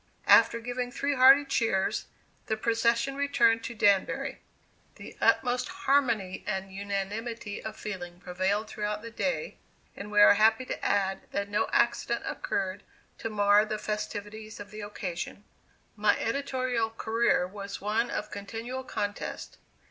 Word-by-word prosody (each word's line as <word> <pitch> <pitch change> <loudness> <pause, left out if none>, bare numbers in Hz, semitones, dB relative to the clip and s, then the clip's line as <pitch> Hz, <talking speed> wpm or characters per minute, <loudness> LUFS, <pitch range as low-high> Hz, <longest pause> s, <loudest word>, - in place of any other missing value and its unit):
After 230 - +6
giving 245 +1 -4
three 280 +2 -1
hearty 270 +2 +7
cheers, 225 -8 0 0.4
the 220 - 0
procession 235 +4 +1
returned 240 -5 +3
to 235 - -5
Danbury. 200 -2 +2 0.6
The - - -11
utmost 250 0 +2
harmony 270 - 0
and 190 -2 -3
unanimity 205 +2 -4
of 220 0 -6
feeling 175 -4 -6
prevailed 185 +4 -1
throughout 210 0 -3
the 230 - -7
day, 275 - -2 0.4
and 205 - -7
we 210 0 +2
are 205 - +9
happy 220 +4 +3
to - - -5
add 195 -1 0
that 200 0 -2
no 205 - +1
accident 235 0 +1
occurred 190 0 -2 0.4
to 225 - -3
mar 205 -1 +4
the 215 0 -3
festivities 210 0 -5
of 205 0 -9
the 215 0 -7
occasion." 200 -1 -5 0.5
My 210 -1 +3
editorial 255 -2 -1
career 225 -3 +1
was 200 +1 -7
one 220 +4 0
of 210 - -4
continual 230 +6 -5
contest. 205 -5 -5
215 Hz, 140 wpm, -28 LUFS, 205-235 Hz, 0.6 s, are